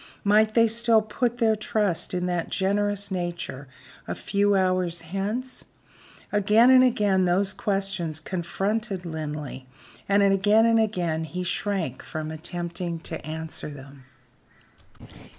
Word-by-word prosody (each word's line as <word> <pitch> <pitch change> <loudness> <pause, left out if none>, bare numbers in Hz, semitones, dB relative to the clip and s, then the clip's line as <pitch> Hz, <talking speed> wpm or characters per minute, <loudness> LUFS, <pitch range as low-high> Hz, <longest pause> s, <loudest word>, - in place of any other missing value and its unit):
Might 215 +1 +3
they 230 -1 +6
still 230 0 +3
put 235 +3 -1
their 225 -3 +3
trust 210 -4 -1
in 180 0 -1
that 175 -2 -2
generous 200 +1 0
nature 175 -7 -4 0.4
a - - -3
few 200 0 +1
hours 185 -2 +1
hence? 205 +9 -4 0.7
Again 210 +4 +5
and 255 0 +7
again 205 -6 +2
those 190 +2 +1
questions 195 -6 -2
confronted 195 +4 -3
Linley; 150 -5 -5 0.4
and 200 0 +4
again 200 +3 +4
and 230 -1 +4
again 175 -7 0
he 180 +3 -5
shrank 180 - -2
from 155 0 -5
attempting 170 +1 -4
to - - -6
answer 160 0 -5
them. 135 -2 -12
195 Hz, 125 wpm, -25 LUFS, 170-210 Hz, 0.7 s, and